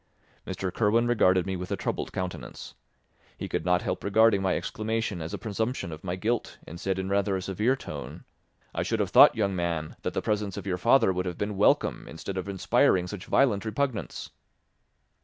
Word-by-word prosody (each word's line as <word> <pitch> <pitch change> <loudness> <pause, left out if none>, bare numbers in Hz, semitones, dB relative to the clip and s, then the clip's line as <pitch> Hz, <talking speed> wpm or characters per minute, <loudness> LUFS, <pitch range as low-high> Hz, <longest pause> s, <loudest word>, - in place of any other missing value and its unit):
Mr. 95 -2 -3
Kirwin 115 +2 +2
regarded 95 -7 +3
me 95 -1 -2
with 90 0 -5
a - - +1
troubled - - -3
countenance. 90 -1 -6 0.6
He - - -5
could - - -2
not 90 0 +2
help 90 0 -3
regarding 105 0 +4
my 95 -1 +1
exclamation 110 -4 -3
as 80 +2 -5
a 100 - -3
presumption 110 -1 -3
of 80 0 -9
my 90 -1 -2
guilt 110 +5 -2
and 85 +2 -9
said 95 0 -1
in 95 0 -3
rather 100 0 +1
a 95 - -2
severe 105 +7 +1
tone, - - -8 0.5
"I - - -1
should - - -1
have - - 0
thought, - - +8
young 100 -3 0
man, 85 -3 -2
that - - -3
the - - 0
presence 105 -2 -1
of - - -6
your 90 -2 -2
father 115 -1 +4
would 90 0 -2
have 90 - -4
been 105 0 -2
welcome 100 - +2
instead 80 +4 -6
of 95 +1 -4
inspiring 95 -1 +2
such 90 0 -7
violent 120 -8 +3
repugnance." 110 -1 -3
95 Hz, 195 wpm, -27 LUFS, 90-110 Hz, 0.6 s, thought